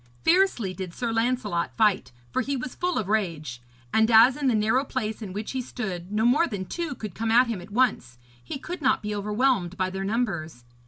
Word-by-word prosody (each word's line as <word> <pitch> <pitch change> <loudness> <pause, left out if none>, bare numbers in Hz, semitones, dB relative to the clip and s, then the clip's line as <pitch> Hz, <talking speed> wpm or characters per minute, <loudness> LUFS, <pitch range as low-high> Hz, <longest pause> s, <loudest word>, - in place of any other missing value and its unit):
Fiercely 330 - +3
did 185 -3 -7
Sir 235 -2 -2
Lancelot 225 -7 -1
fight, 215 -4 +2 0.2
for - - +1
he 275 +2 -2
was 255 0 -5
full 360 0 -1
of 210 - -1
rage; 165 - -2 0.3
and 220 +1 +4
as 235 +3 +7
in 290 -2 -1
the 245 - +3
narrow 220 +5 +2
place 225 -5 -4
in 205 -4 -6
which 210 +3 -5
he 260 - -2
stood, 195 -7 -5
no 215 +2 +1
more 290 +8 +4
than 200 -5 -4
two 330 - -4
could 215 -5 -7
come 225 +4 -2
at 240 +3 +6
him 225 -6 -4
at 180 - -12
once, 205 - 0 0.3
he 120 - -5
could 350 +5 -7
not 260 -4 +2
be 210 0 -3
overwhelmed 210 -2 0
by 185 0 0
their 190 +1 -4
numbers. 195 - -2
220 Hz, 215 wpm, -26 LUFS, 190-255 Hz, 0.3 s, as